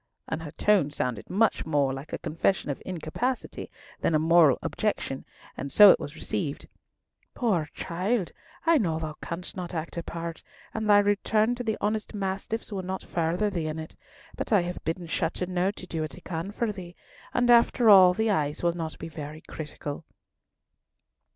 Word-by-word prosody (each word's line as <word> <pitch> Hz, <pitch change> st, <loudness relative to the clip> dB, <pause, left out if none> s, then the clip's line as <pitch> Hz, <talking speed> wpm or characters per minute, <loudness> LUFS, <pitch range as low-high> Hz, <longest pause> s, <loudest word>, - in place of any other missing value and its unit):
and 160 Hz, -, -3 dB
her 160 Hz, -, -6 dB
tone 205 Hz, -8 st, +3 dB
sounded 125 Hz, -6 st, -3 dB
much 215 Hz, +4 st, +2 dB
more 145 Hz, -4 st, +1 dB
like 135 Hz, +3 st, -8 dB
a -, -, -2 dB
confession 165 Hz, 0 st, 0 dB
of 140 Hz, -, -6 dB
incapacity 185 Hz, +9 st, -3 dB, 0.3 s
than 165 Hz, -, +1 dB
a -, -, +6 dB
moral 160 Hz, -2 st, +5 dB
objection, 205 Hz, -10 st, -2 dB, 0.3 s
and 140 Hz, +1 st, -5 dB
so 205 Hz, -2 st, +10 dB
it -, -, +3 dB
was 145 Hz, +2 st, -7 dB
received: 155 Hz, -2 st, -3 dB, 0.7 s
"Poor 185 Hz, -11 st, +1 dB
child, 185 Hz, +3 st, -1 dB, 0.3 s
I 330 Hz, -2 st, +5 dB
know 165 Hz, -6 st, 0 dB
thou 155 Hz, -1 st, -4 dB
canst 175 Hz, +1 st, -5 dB
not 180 Hz, -2 st, -5 dB
act 165 Hz, +1 st, -4 dB
a -, -, 0 dB
part, 165 Hz, 0 st, -6 dB, 0.3 s
and 220 Hz, -1 st, -2 dB
thy 205 Hz, -, +8 dB
return 205 Hz, +3 st, +2 dB
to 245 Hz, 0 st, -4 dB
the 220 Hz, -2 st, -1 dB
honest 215 Hz, 0 st, -2 dB
mastiffs 195 Hz, +3 st, -3 dB
will 195 Hz, -2 st, -2 dB
not 185 Hz, +1 st, -4 dB
further 175 Hz, +5 st, 0 dB
thee 170 Hz, -4 st, -2 dB
in 155 Hz, 0 st, -3 dB
it; 160 Hz, 0 st, -7 dB, 0.4 s
but -, -, -4 dB
I 205 Hz, -4 st, +5 dB
have 175 Hz, +1 st, -5 dB
bidden 170 Hz, +2 st, -3 dB
Chateauneuf 180 Hz, +3 st, -1 dB
to -, -, -9 dB
do 165 Hz, -3 st, -3 dB
what 155 Hz, -, -4 dB
he 180 Hz, -, -11 dB
can 170 Hz, +2 st, -4 dB
for 220 Hz, +1 st, -1 dB
thee—and 200 Hz, +6 st, -3 dB
after 235 Hz, 0 st, +5 dB
all 185 Hz, -3 st, +9 dB
the 220 Hz, +1 st, +1 dB
eyes 150 Hz, -5 st, -1 dB
will 170 Hz, 0 st, +3 dB
not 165 Hz, -2 st, -5 dB
be -, -, -6 dB
very 155 Hz, 0 st, -8 dB
critical." 150 Hz, -1 st, -7 dB
175 Hz, 180 wpm, -27 LUFS, 160-205 Hz, 0.7 s, so